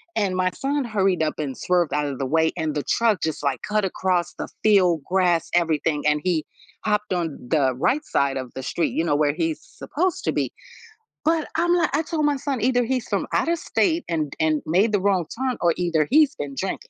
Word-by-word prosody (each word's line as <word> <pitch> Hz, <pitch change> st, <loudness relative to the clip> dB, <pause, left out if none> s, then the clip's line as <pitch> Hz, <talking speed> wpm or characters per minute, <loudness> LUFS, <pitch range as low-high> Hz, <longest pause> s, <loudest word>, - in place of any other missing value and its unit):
and 200 Hz, -4 st, 0 dB
my 185 Hz, 0 st, +2 dB
son 280 Hz, +5 st, -1 dB
hurried 195 Hz, -7 st, +1 dB
up 155 Hz, -, -1 dB
and 140 Hz, -4 st, -3 dB
swerved 180 Hz, -3 st, +1 dB
out 150 Hz, 0 st, 0 dB
of 140 Hz, -2 st, -4 dB
the 135 Hz, -, -1 dB
way 160 Hz, +4 st, +2 dB
and 155 Hz, -1 st, -1 dB
the 145 Hz, -, -1 dB
truck, 225 Hz, -5 st, +1 dB
just, 160 Hz, -2 st, -2 dB
like, 135 Hz, -3 st, -1 dB
cut 210 Hz, -1 st, 0 dB
across 180 Hz, -2 st, -1 dB
the -, -, -6 dB, 0.2 s
field, 185 Hz, -7 st, +4 dB
grass, 180 Hz, -3 st, +1 dB
everything, 160 Hz, -3 st, +1 dB
and 150 Hz, 0 st, +3 dB
he 170 Hz, -4 st, 0 dB, 0.4 s
hopped 210 Hz, -2 st, 0 dB
on 165 Hz, -5 st, -2 dB
the 135 Hz, -5 st, +2 dB
right 265 Hz, -, +1 dB
side 140 Hz, -1 st, 0 dB
of 130 Hz, -2 st, -6 dB
the 130 Hz, -, -5 dB
street, 165 Hz, +6 st, -1 dB
you 165 Hz, -, 0 dB
know, 145 Hz, -4 st, +1 dB
where 145 Hz, -1 st, +2 dB
he's 165 Hz, -1 st, -2 dB
supposed 360 Hz, +4 st, -3 dB
to -, -, +1 dB
be, -, -, -1 dB, 0.7 s
but, 320 Hz, 0 st, +2 dB
I'm 345 Hz, +2 st, +2 dB
like 340 Hz, -2 st, +2 dB
I 310 Hz, -, +1 dB
told 310 Hz, -1 st, -1 dB
my 290 Hz, -1 st, +2 dB
son 265 Hz, -3 st, -3 dB
either 245 Hz, +1 st, +2 dB
he's 255 Hz, 0 st, -2 dB
from -, -, -1 dB
out 335 Hz, -, +1 dB
of 340 Hz, -1 st, +1 dB
state 335 Hz, -2 st, +1 dB
and 155 Hz, -4 st, -1 dB
and 155 Hz, -1 st, +2 dB
made 190 Hz, +8 st, +2 dB
the 205 Hz, -, +2 dB
wrong 190 Hz, -3 st, +2 dB
turn 260 Hz, -1 st, -1 dB
or 170 Hz, -1 st, +3 dB
either 170 Hz, -4 st, +1 dB
he's 295 Hz, +1 st, +4 dB
been 140 Hz, -1 st, -6 dB
drinking. 190 Hz, +6 st, -4 dB
180 Hz, 225 wpm, -23 LUFS, 155-240 Hz, 0.7 s, field